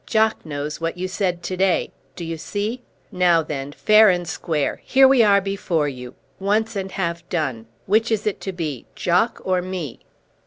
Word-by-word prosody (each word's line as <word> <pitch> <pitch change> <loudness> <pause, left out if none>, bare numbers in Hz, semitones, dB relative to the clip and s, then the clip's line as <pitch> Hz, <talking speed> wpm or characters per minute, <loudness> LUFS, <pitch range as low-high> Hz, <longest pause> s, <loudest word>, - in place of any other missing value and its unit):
Jock 220 -1 +2
knows 150 0 -5
what 165 +1 -2
you 185 +1 -2
said 185 -2 -2
to 185 - -3
day. 190 0 +1 0.2
D'you 165 -2 -4
see? 205 +9 -3 0.3
Now 175 -2 +3
then, 145 -2 -5
fair 215 +6 +5
and 175 -2 0
square! 160 -2 -2
Here 265 0 +6
we 265 -2 +5
are 200 -2 +5
before 190 -6 -1
you; 125 -2 -7 0.2
once 215 +3 0
and 190 -1 -3
have 170 -3 -2
done. 130 -10 -2 0.2
Which 220 +4 +2
is 215 -2 0
it 210 - -2
to 190 - -3
be, 155 -8 -5
Jock 185 +7 +1
or 185 -1 +1
me?" 180 -8 -5
180 Hz, 180 wpm, -22 LUFS, 160-205 Hz, 0.3 s, Here